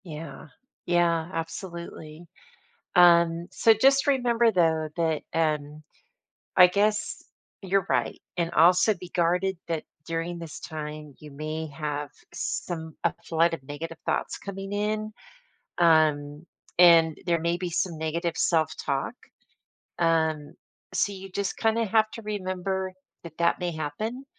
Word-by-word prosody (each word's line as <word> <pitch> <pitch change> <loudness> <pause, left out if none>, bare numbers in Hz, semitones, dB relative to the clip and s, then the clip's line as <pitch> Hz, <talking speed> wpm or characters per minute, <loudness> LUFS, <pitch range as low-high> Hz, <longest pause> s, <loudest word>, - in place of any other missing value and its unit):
Yeah, 160 -1 -8 0.4
yeah 170 -1 +2
absolutely. 170 -1 -7 0.7
Um, 170 -1 +5
so 225 - +4
just 270 +5 +4
remember 240 -4 +3
though 160 -4 +2
that, 160 -3 0
um, 150 -2 -1 0.7
I 180 - +10
guess 205 +3 0 0.4
you're 195 0 +1
right - - 0 0.2
and 170 -1 0
also 180 +6 +5
be 180 -1 -11
guarded 180 +2 +1
that 165 -2 -2 0.2
during 165 +1 -3
this 165 -3 -8
time 150 -1 -7
you 150 - -12
may 155 +2 -4
have 150 -1 -4 0.2
some 160 -2 -4
a 170 - +3
flood 165 +1 +2
of 165 - -8
negative 160 +4 -7
thoughts - - -1
coming 195 0 -7
in, 215 +1 -1 0.7
um, 155 -2 +3 0.3
and 165 -3 +7
there 170 -1 +2
may 170 +1 0
be 180 0 -3
some 170 0 -1
negative 165 +2 -2
self-talk. 155 - 0 0.9
Um, 160 -3 +1 0.4
so 195 +2 +1
you 195 0 -9
just 195 +1 -2
kinda 225 0 +1
have 220 +1 +3
to 225 - -8
remember 190 -2 -3 0.3
that 165 -2 -11
that 170 0 +2
may 175 -1 -2
happen 210 - -4
170 Hz, 130 wpm, -26 LUFS, 160-190 Hz, 0.9 s, I